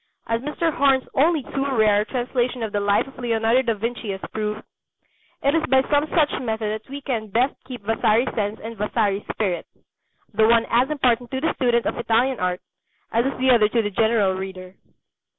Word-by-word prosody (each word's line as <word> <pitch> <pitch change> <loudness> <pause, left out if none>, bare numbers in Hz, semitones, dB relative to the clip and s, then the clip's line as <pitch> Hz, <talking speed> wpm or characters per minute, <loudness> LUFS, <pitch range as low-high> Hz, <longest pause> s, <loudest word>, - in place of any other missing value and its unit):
As 230 0 -1
Mr. 300 +4 -1
Horne's 270 -2 +2
only 310 +1 +2
too 275 +2 -3
rare 210 -2 +4
translation 245 0 -2
of 220 - -3
the 205 - 0
Life 200 0 +2
of 270 - -14
Leonardo 230 0 +2
da 235 -3 0
Vinci 230 +1 -4
has 190 -1 -4
proved, 215 0 -3 0.8
it 280 - +3
is 325 -1 +2
by 265 0 +4
some 290 +1 +3
such 300 -2 +1
method 220 -3 -2
that - - -29
we 280 +1 -6
can 235 -5 -3
best 245 +7 +1
keep 250 -5 -8
Vasari's 225 +2 +1
sense 210 0 -2
and 230 +1 -6
Vasari's 205 -1 0
spirit 190 -5 -2 0.7
the 220 +1 +4
one 230 0 +4
as 245 +4 +3
important 250 -5 +1
to 265 - -3
the 320 +4 0
student 240 -2 +1
of - - -2
Italian 235 +3 +1
art 180 0 -1 0.5
as 235 +3 +2
is 275 - -3
the 260 0 +3
other 220 -4 +5
to 230 +1 +2
the 205 - -2
general 220 -2 +2
reader. 185 -1 -7
230 Hz, 195 wpm, -23 LUFS, 215-260 Hz, 0.8 s, other